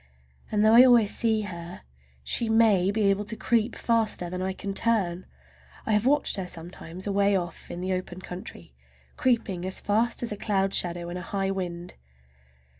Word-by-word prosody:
And 210 Hz, 0 st, +2 dB
though 220 Hz, -, +5 dB
I 240 Hz, +2 st, +9 dB
always 240 Hz, -5 st, +5 dB
see 220 Hz, -2 st, +2 dB
her 175 Hz, -4 st, -8 dB, 0.4 s
she 225 Hz, -, 0 dB
may 220 Hz, -5 st, +4 dB
be 210 Hz, +1 st, 0 dB
able 200 Hz, +1 st, -1 dB
to 215 Hz, +2 st, -5 dB
creep 230 Hz, +1 st, 0 dB
faster 220 Hz, -7 st, 0 dB
than 180 Hz, 0 st, -4 dB
I 190 Hz, +1 st, -1 dB
can 195 Hz, +1 st, -5 dB
turn! 195 Hz, -5 st, 0 dB, 0.6 s
I -, -, -1 dB
have 210 Hz, +3 st, +2 dB
watched 290 Hz, -5 st, +2 dB
her 190 Hz, -2 st, -4 dB
sometimes 175 Hz, +1 st, -7 dB
away 200 Hz, 0 st, +2 dB
off 175 Hz, -2 st, -4 dB
in 175 Hz, -, -6 dB
the 185 Hz, +1 st, -1 dB
open 185 Hz, 0 st, -5 dB
country, 180 Hz, -, -9 dB, 0.4 s
creeping 225 Hz, -8 st, 0 dB
as 185 Hz, +1 st, -1 dB
fast 230 Hz, +4 st, 0 dB
as 235 Hz, -, -2 dB
a 210 Hz, -, -4 dB
cloud 195 Hz, -2 st, 0 dB
shadow 175 Hz, -1 st, 0 dB
in 175 Hz, -, -5 dB
a -, -, -5 dB
high 195 Hz, +1 st, -2 dB
wind. 175 Hz, -2 st, -5 dB
195 Hz, 185 wpm, -26 LUFS, 180-220 Hz, 0.6 s, I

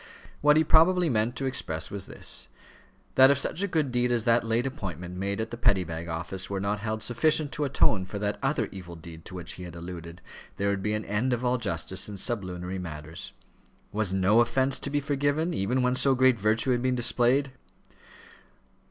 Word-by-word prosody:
What 150 Hz, +1 st, +5 dB
he 160 Hz, -, +5 dB
probably 170 Hz, +3 st, +4 dB
meant 115 Hz, +2 st, 0 dB
to 135 Hz, -, -3 dB
express 80 Hz, -11 st, -2 dB
was 100 Hz, -2 st, -5 dB
this: -, -, -1 dB, 0.7 s
that 130 Hz, 0 st, +7 dB
if 140 Hz, -, +4 dB
such 155 Hz, -, 0 dB
a 200 Hz, -, +1 dB
good 155 Hz, -7 st, 0 dB
deed 125 Hz, 0 st, +1 dB
as 120 Hz, -2 st, +1 dB
that 115 Hz, +1 st, +3 dB
late 115 Hz, +2 st, 0 dB
appointment 90 Hz, -, -5 dB
made 100 Hz, +2 st, -2 dB
at 110 Hz, 0 st, -3 dB
the 120 Hz, -, -5 dB
Petty 100 Hz, -5 st, +3 dB
Bag 85 Hz, 0 st, -6 dB
Office 85 Hz, +3 st, -4 dB
were 100 Hz, -1 st, -2 dB
not 100 Hz, +2 st, -1 dB
held 110 Hz, +1 st, -3 dB
sufficient 150 Hz, +4 st, +2 dB
to 150 Hz, -, -1 dB
atone 110 Hz, -8 st, +2 dB
for 100 Hz, -, -6 dB
that 105 Hz, 0 st, -2 dB
other 135 Hz, -5 st, 0 dB
evil 90 Hz, -3 st, -9 dB
deed 80 Hz, 0 st, -11 dB
to 90 Hz, -, -8 dB
which 90 Hz, -2 st, -4 dB
he 90 Hz, -, -9 dB
had 85 Hz, -1 st, -9 dB
alluded, 85 Hz, 0 st, -8 dB, 0.4 s
there 100 Hz, 0 st, 0 dB
would 100 Hz, -1 st, -1 dB
be 105 Hz, +2 st, -1 dB
an 105 Hz, -, -4 dB
end 110 Hz, +5 st, 0 dB
of 120 Hz, +1 st, -2 dB
all 125 Hz, 0 st, +1 dB
justice 95 Hz, -1 st, -2 dB
in 100 Hz, -, -7 dB
sublunary 95 Hz, -3 st, -2 dB
matters. 80 Hz, -1 st, -7 dB, 0.6 s
Was 105 Hz, -2 st, 0 dB
no 95 Hz, +4 st, +3 dB
offence 130 Hz, +3 st, +2 dB
to -, -, -3 dB
be 145 Hz, +1 st, +1 dB
forgiven, 145 Hz, +4 st, 0 dB
even 125 Hz, +5 st, 0 dB
when 125 Hz, 0 st, +2 dB
so 135 Hz, +1 st, +4 dB
great 130 Hz, -2 st, +4 dB
virtue 110 Hz, +5 st, +2 dB
had 120 Hz, -1 st, +1 dB
been 130 Hz, 0 st, +1 dB
displayed? 125 Hz, +3 st, +2 dB
110 Hz, 205 wpm, -27 LUFS, 95-130 Hz, 0.7 s, that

